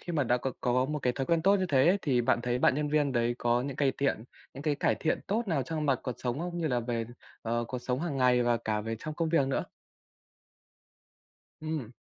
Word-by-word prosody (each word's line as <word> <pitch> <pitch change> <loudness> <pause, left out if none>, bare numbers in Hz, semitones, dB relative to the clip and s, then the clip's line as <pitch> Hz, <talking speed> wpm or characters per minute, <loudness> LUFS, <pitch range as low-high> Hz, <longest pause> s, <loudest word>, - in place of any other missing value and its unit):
khi 175 - -6
mà 145 -4 +1
đã 120 +1 +2
có 130 +1 -3
có 125 +1 +2
một 150 +2 -2
cái 125 -2 0
thói 135 +1 -3
quen 165 -1 +2
tốt 200 +2 +5
như 185 -1 0
hế 130 +1 +5
ấy, 190 +4 +4
thì 130 -6 +2
bạn 120 0 +2
thấy 125 0 0
bạn 130 - +4
nhân 150 0 -1
viên 145 -2 +1
đấy 120 0 +1
có 120 +1 +1
những 140 -1 -5
cây 140 -3 +2
tiện 135 -5 0 0.3
những 140 - -7
cái 150 -2 +1
cải - - +1
thiện 155 - -1
tốt 220 +4 0
nào 145 -6 +1
trong 155 +3 -3
mặt 135 -3 +2
cuộc 125 - -3
sống 125 +2 -2
không, 175 0 -4
như 165 - -1
là 125 -4 +1
về, 115 -1 -2 0.4
ờ, 120 +1 -1
cuộc 125 - -3
sống 125 +1 -2
hàng 160 -5 -2
ngày 125 -1 +4
và 120 -1 +2
cả 105 -2 -2
về 115 +1 -4
trong 155 +4 -6
công 165 0 -1
việc 150 -5 +3
nữa? 135 - -1 2.0
Ừm. 155 -7 -4
135 Hz, 255 wpm, -29 LUFS, 120-155 Hz, 2.0 s, tốt